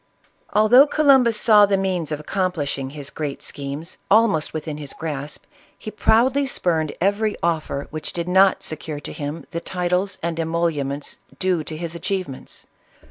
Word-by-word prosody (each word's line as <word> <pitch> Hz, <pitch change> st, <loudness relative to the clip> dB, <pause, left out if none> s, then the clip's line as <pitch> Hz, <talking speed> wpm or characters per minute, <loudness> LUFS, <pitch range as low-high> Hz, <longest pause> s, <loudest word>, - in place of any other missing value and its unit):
Although 235 Hz, +7 st, +6 dB
Columbus 270 Hz, -7 st, +4 dB
saw 210 Hz, -3 st, +6 dB
the 195 Hz, -1 st, +2 dB
means 185 Hz, -5 st, -1 dB
of 150 Hz, -, -2 dB
accomplishing 150 Hz, -6 st, -2 dB
his 145 Hz, 0 st, -8 dB
great 150 Hz, -3 st, -5 dB
schemes, 140 Hz, +4 st, -6 dB
almost 200 Hz, -7 st, +3 dB
within 155 Hz, -1 st, -5 dB
his 145 Hz, -2 st, -7 dB
grasp, 150 Hz, -2 st, -5 dB, 0.3 s
he 215 Hz, -, -7 dB
proudly 255 Hz, +6 st, +3 dB
spurned 160 Hz, -, 0 dB
every 205 Hz, +3 st, +1 dB
offer 155 Hz, -4 st, -1 dB
which 155 Hz, 0 st, -4 dB
did 170 Hz, 0 st, -4 dB
not 190 Hz, +1 st, +4 dB
secure 155 Hz, -1 st, -3 dB
to -, -, -7 dB
him 145 Hz, +2 st, -5 dB
the 170 Hz, -1 st, -3 dB
titles 180 Hz, +2 st, -1 dB
and 165 Hz, -1 st, -2 dB
emoluments 160 Hz, -4 st, -2 dB, 0.2 s
due 185 Hz, -4 st, 0 dB
to 155 Hz, -, -5 dB
his 170 Hz, 0 st, -4 dB
achievements. 175 Hz, -4 st, -5 dB
170 Hz, 150 wpm, -22 LUFS, 150-200 Hz, 0.3 s, Although